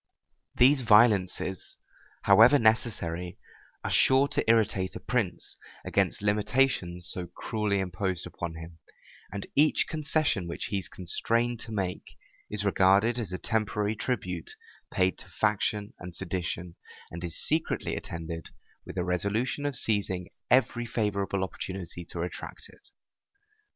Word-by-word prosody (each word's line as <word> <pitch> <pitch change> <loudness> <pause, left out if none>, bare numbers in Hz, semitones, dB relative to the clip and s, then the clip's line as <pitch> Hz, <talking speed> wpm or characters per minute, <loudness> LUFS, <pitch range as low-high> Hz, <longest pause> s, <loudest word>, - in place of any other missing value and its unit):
These 135 +2 +5
violences, 105 -5 +3 0.5
however 120 +6 +7
necessary, 90 -7 0 0.5
are - - -2
sure 135 +1 +5
to 145 0 0
irritate 105 -5 +2
a - - -5
prince - - -1 0.3
against - - 0
limitations 105 -4 +1
so 90 -1 +1
cruelly 105 +3 -2
imposed 95 -1 -2
upon 85 -1 -6
him; 80 0 -10 0.5
and 100 0 -5
each 150 +2 +4
concession 155 - 0
which 85 - -4
he 100 - +1
is 95 0 -6
constrained 115 +7 -1
to 115 - -5
make, 95 -4 -4 0.3
is 105 -1 -3
regarded 100 +5 +4
as 105 -7 -4
a 90 - -2
temporary 105 0 0
tribute 90 -8 -3 0.4
paid 95 -2 +1
to - - -8
faction 105 0 0
and 90 -1 -8
sedition, 85 -2 -4 0.3
and 85 +2 -7
is 85 -2 -3
secretly 160 +1 0
attended 80 0 -6 0.4
with - - -8
a 90 - +1
resolution 100 +10 -1
of 145 - -3
seizing 100 -6 -1 0.2
every 120 -1 +3
favorable 100 -4 -1
opportunity 95 -2 -6
to - - -9
retract 85 +1 -6
it. - - -18
100 Hz, 130 wpm, -28 LUFS, 90-115 Hz, 0.5 s, however